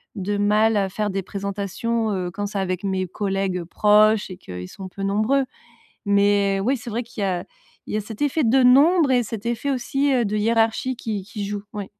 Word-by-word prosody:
de 205 Hz, +1 st, -2 dB
mal 210 Hz, +2 st, +3 dB
à 195 Hz, -1 st, +1 dB
faire 210 Hz, +2 st, -2 dB
des 195 Hz, 0 st, -2 dB
présentations, 200 Hz, +4 st, -2 dB
heu, 180 Hz, -3 st, -2 dB
quand 205 Hz, +3 st, -3 dB
c'est 200 Hz, -, -5 dB
avec 185 Hz, -1 st, -2 dB
mes 190 Hz, -1 st, -1 dB
collègues 195 Hz, -1 st, -2 dB
proches 210 Hz, +4 st, +3 dB
et 180 Hz, -, -8 dB
qu'ils 90 Hz, -, -8 dB
sont 190 Hz, -, -9 dB
peu 195 Hz, +2 st, -7 dB
nombreux, 215 Hz, +8 st, +1 dB, 0.6 s
mais 200 Hz, -1 st, +3 dB
oui, 260 Hz, +6 st, +2 dB
c'est 235 Hz, -, -8 dB
vrai 230 Hz, +3 st, -1 dB
qu'il 230 Hz, -3 st, -8 dB
y -, -, +1 dB
a 185 Hz, -2 st, -2 dB, 0.4 s
il -, -, -5 dB
y -, -, +1 dB
a -, -, -1 dB
cet 215 Hz, +5 st, -5 dB
effet 290 Hz, +1 st, +1 dB
de 255 Hz, +3 st, +4 dB
nombre 285 Hz, +5 st, +5 dB
et 250 Hz, -1 st, +4 dB
cet 225 Hz, -2 st, -6 dB
effet 235 Hz, +4 st, -2 dB
aussi, 275 Hz, +2 st, 0 dB
heu, 250 Hz, -3 st, +2 dB
de 210 Hz, +1 st, -2 dB
hiérarchie 225 Hz, +3 st, +1 dB
qui 215 Hz, -4 st, -4 dB
qui 205 Hz, +1 st, -6 dB
joue, 205 Hz, 0 st, -4 dB
oui. 205 Hz, -1 st, -4 dB
210 Hz, 215 wpm, -22 LUFS, 195-235 Hz, 0.6 s, nombre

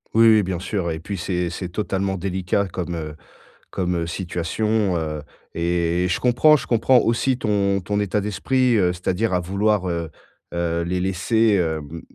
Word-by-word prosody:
Oui, 115 Hz, 0 st, +7 dB
oui, 110 Hz, -1 st, +6 dB
bien 90 Hz, -1 st, -2 dB
sûr, 95 Hz, -1 st, -2 dB
et 80 Hz, -1 st, -3 dB
puis, 100 Hz, +5 st, -5 dB
c'est 90 Hz, -1 st, -2 dB
c'est 90 Hz, +1 st, -5 dB
totalement 95 Hz, 0 st, -2 dB
délicat 95 Hz, +1 st, -1 dB
comme, 90 Hz, -1 st, -4 dB
heu, 75 Hz, -2 st, -5 dB, 0.6 s
comme, 90 Hz, -2 st, -1 dB
heu, 85 Hz, -1 st, -2 dB
situation, 95 Hz, +3 st, -1 dB
heu, 75 Hz, -2 st, -3 dB, 0.3 s
et 85 Hz, +1 st, 0 dB
et -, -, +1 dB
je 90 Hz, -, 0 dB
comprends, 125 Hz, +5 st, +5 dB
je -, -, -7 dB
comprends 120 Hz, +2 st, +4 dB
aussi 120 Hz, +3 st, +1 dB
ton 100 Hz, -4 st, +1 dB
ton 100 Hz, +3 st, -2 dB
état 105 Hz, 0 st, 0 dB
d'esprit, 125 Hz, +5 st, +1 dB
heu, 90 Hz, -3 st, +3 dB
c'est-à-dire 95 Hz, +4 st, -1 dB
à 90 Hz, -, +2 dB
vouloir, 100 Hz, +2 st, 0 dB
heu, 85 Hz, -1 st, -3 dB, 0.5 s
heu, 85 Hz, -1 st, 0 dB
les 90 Hz, +2 st, -1 dB
laisser, 105 Hz, +4 st, +2 dB
hem, 80 Hz, -3 st, -2 dB
95 Hz, 180 wpm, -22 LUFS, 85-105 Hz, 0.6 s, Oui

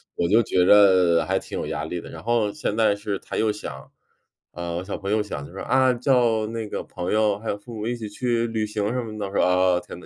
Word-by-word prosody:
我 85 Hz, -, 0 dB
就 110 Hz, +6 st, +4 dB
觉 90 Hz, -3 st, +2 dB
着 95 Hz, -4 st, +5 dB
还 95 Hz, +1 st, 0 dB
挺 -, -, -7 dB
有 -, -, -3 dB
压 -, -, -3 dB
力 85 Hz, +2 st, -4 dB
的。 -, -, -11 dB
然 80 Hz, -, -9 dB
后 115 Hz, 0 st, +1 dB
现 140 Hz, -7 st, -3 dB
在 110 Hz, -2 st, +3 dB
是 100 Hz, -1 st, -3 dB
他 -, -, -6 dB
又 110 Hz, -, +2 dB
想 105 Hz, -, -8 dB, 0.6 s
啊， 85 Hz, 0 st, -5 dB
我 85 Hz, +2 st, -3 dB
小 100 Hz, -, -5 dB
朋 100 Hz, -1 st, -6 dB
友 105 Hz, +1 st, +2 dB
想 70 Hz, -9 st, -6 dB
就 85 Hz, -, -13 dB
说： 95 Hz, -, -7 dB
“啊， 130 Hz, -1 st, +3 dB
叫 120 Hz, -3 st, +2 dB
那 115 Hz, -1 st, -4 dB
个 -, -, -4 dB
朋 90 Hz, 0 st, -4 dB
友 105 Hz, -2 st, +2 dB
还 110 Hz, -, -5 dB
有 100 Hz, -, -1 dB
父 115 Hz, +4 st, -12 dB
母 110 Hz, 0 st, -4 dB
一 120 Hz, -, -1 dB
起 110 Hz, -3 st, -6 dB
去 115 Hz, +2 st, -1 dB
旅 110 Hz, -1 st, -1 dB
行 105 Hz, -1 st, -2 dB
什 125 Hz, -, -1 dB
么 110 Hz, -2 st, -7 dB
的。” 105 Hz, -, -3 dB
我 95 Hz, -, -9 dB
说： -, -, +2 dB
“啊， 90 Hz, 0 st, +3 dB
天 -, -, -10 dB
哪， -, -, -14 dB
105 Hz, 295 characters per minute, -24 LUFS, 95-115 Hz, 0.6 s, 着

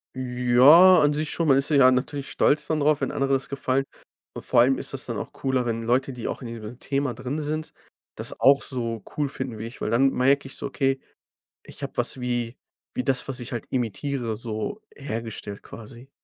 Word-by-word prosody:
Ja, 130 Hz, +8 st, +6 dB
an 150 Hz, 0 st, +3 dB
sich 150 Hz, +1 st, -2 dB
schon. 165 Hz, -2 st, -1 dB
Man 135 Hz, -1 st, +5 dB
ist 140 Hz, -, 0 dB
ja 135 Hz, -4 st, +6 dB
natürlich 135 Hz, +2 st, -2 dB
stolz 150 Hz, +1 st, +2 dB
dann 155 Hz, -1 st, 0 dB
darauf, 150 Hz, 0 st, +2 dB
wenn -, -, -1 dB
andere 140 Hz, -1 st, 0 dB
das 135 Hz, -, -1 dB
gefallen. 135 Hz, -1 st, 0 dB, 0.6 s
Vor -, -, +3 dB
allem 130 Hz, +2 st, +3 dB
ist -, -, -6 dB
das -, -, -5 dB
dann -, -, -4 dB
auch -, -, -6 dB
cooler, 130 Hz, -2 st, -1 dB
wenn 115 Hz, -1 st, -2 dB
Leute, 130 Hz, +3 st, +1 dB
die 120 Hz, -2 st, -5 dB
auch -, -, -4 dB
in 125 Hz, -, -6 dB
diesem 115 Hz, +1 st, -8 dB
Thema 140 Hz, -2 st, -1 dB
drin 130 Hz, +5 st, -4 dB
sind, 155 Hz, +1 st, -4 dB, 0.4 s
das -, -, -6 dB
auch 140 Hz, 0 st, +5 dB
so 115 Hz, -4 st, -4 dB
cool 145 Hz, -2 st, 0 dB
finden, 130 Hz, -4 st, -5 dB
wie 110 Hz, -, -5 dB
ich, 120 Hz, -, -12 dB
weil -, -, -1 dB
dann 135 Hz, +4 st, +4 dB
merke 135 Hz, +2 st, +2 dB
ich -, -, -9 dB
so: -, -, -4 dB
„Okay, 135 Hz, -1 st, 0 dB, 0.6 s
ich -, -, -12 dB
habe -, -, -5 dB
was, -, -, -1 dB
wie 120 Hz, -1 st, -2 dB, 0.4 s
wie 125 Hz, -, -2 dB
das, 130 Hz, 0 st, 0 dB
was 135 Hz, -1 st, -4 dB
ich 120 Hz, -, -7 dB
halt 120 Hz, -3 st, -4 dB
imitiere 120 Hz, -1 st, -2 dB
so 115 Hz, -, -5 dB
hergestellt 115 Hz, -6 st, -6 dB
quasi." 120 Hz, +4 st, -12 dB
130 Hz, 210 wpm, -25 LUFS, 120-140 Hz, 0.6 s, Ja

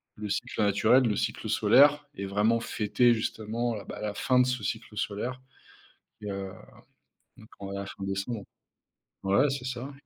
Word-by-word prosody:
le 105 Hz, 0 st, -6 dB
cycle 100 Hz, -, -2 dB
naturel, 110 Hz, +6 st, +4 dB
le 110 Hz, -3 st, +1 dB
cycle -, -, -2 dB
solaire 145 Hz, +2 st, +5 dB
et 100 Hz, -, -4 dB
vraiment 105 Hz, +4 st, +2 dB
fêter 120 Hz, +2 st, +2 dB
justement, 115 Hz, +1 st, -2 dB
heu, 100 Hz, -, -8 dB
bah, -, -, -7 dB
la 105 Hz, -1 st, -2 dB
fin 125 Hz, -1 st, +2 dB
de 125 Hz, -, +5 dB
ce 125 Hz, -4 st, -2 dB
cycle 110 Hz, 0 st, -4 dB
solaire, 110 Hz, +5 st, -3 dB, 0.8 s
et 105 Hz, -, -4 dB
heu, 100 Hz, -1 st, -4 dB, 0.9 s
donc 110 Hz, -, -15 dB
on 100 Hz, -1 st, -6 dB
va 100 Hz, -, -3 dB
être 100 Hz, -, -8 dB
en -, -, -5 dB
décembre. 100 Hz, +4 st, -3 dB, 0.8 s
Ouais, 130 Hz, +9 st, +3 dB
c'est 135 Hz, -2 st, -4 dB
ça. 130 Hz, +2 st, -5 dB
110 Hz, 175 wpm, -28 LUFS, 100-125 Hz, 0.9 s, solaire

